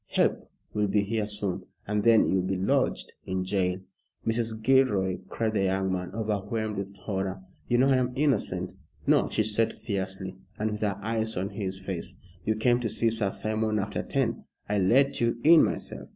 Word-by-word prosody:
Help - - +1 0.2
will 105 -1 +1
be 100 +1 +2
here 105 0 -1
soon, 105 -3 -2 0.2
and 105 0 0
then 115 -1 +6
you'll 95 - +2
be 95 +1 -1
lodged 95 - 0
in 95 0 -1
jail." 95 -1 0 0.5
"Mrs. 115 -1 0
Gilroy," 105 -8 +3
cried 110 -1 -1
the 100 -2 +2
young 95 0 +1
man, 90 -1 -3
overwhelmed 110 0 -2
with 100 0 -5
horror, 95 -2 -3 0.2
"you 120 - +2
know 130 +2 +4
I 135 - +5
am 125 0 +1
innocent." 95 -11 0 0.3
"No," - - +3
she 110 - +1
said 110 +1 +2
fiercely, 95 -2 -3 0.2
and 110 +1 -1
with 105 - -5
her 100 -2 0
eyes 110 -1 -1
on 95 +2 -1
his 95 -2 -4
face. 95 -1 -5 0.3
"You 110 - +1
came 120 +3 +3
to 115 -2 -1
see 115 +2 +1
Sir 110 -3 0
Simon 110 +1 -1
after 100 0 -2
ten. - - -1 0.2
I 105 0 +1
let 130 +10 +3
you 115 0 +1
in 165 +1 +8
myself. - - -3
105 Hz, 185 wpm, -28 LUFS, 95-115 Hz, 0.5 s, in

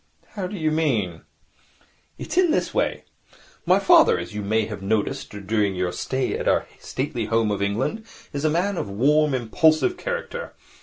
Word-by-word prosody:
'How 195 -4 -4
do 205 - -7
you 155 -2 0
mean?' 115 - 0 1.0
'It - - -6
is 365 -1 +4
this - - 0
way. - - 0 0.6
My 185 +2 +6
father, 195 -1 +5
as 85 +2 -6
you 105 - -4
may 110 +2 +1
have 105 -2 -7
noticed 110 +7 -1 0.2
during 105 -2 +1
your 90 -1 -1
stay 130 +8 -2
at - - -3
our - - +2
stately 130 -4 -3
home 115 -1 +1
of 100 - -2
England, 120 - -1 0.3
is 140 0 -3
a 155 - +3
man 180 +5 0
of 100 - -3
a - - -7
warm, 145 +6 +3
impulsive 155 - +2
character. 485 +1 -5
130 Hz, 175 wpm, -23 LUFS, 105-170 Hz, 1.0 s, My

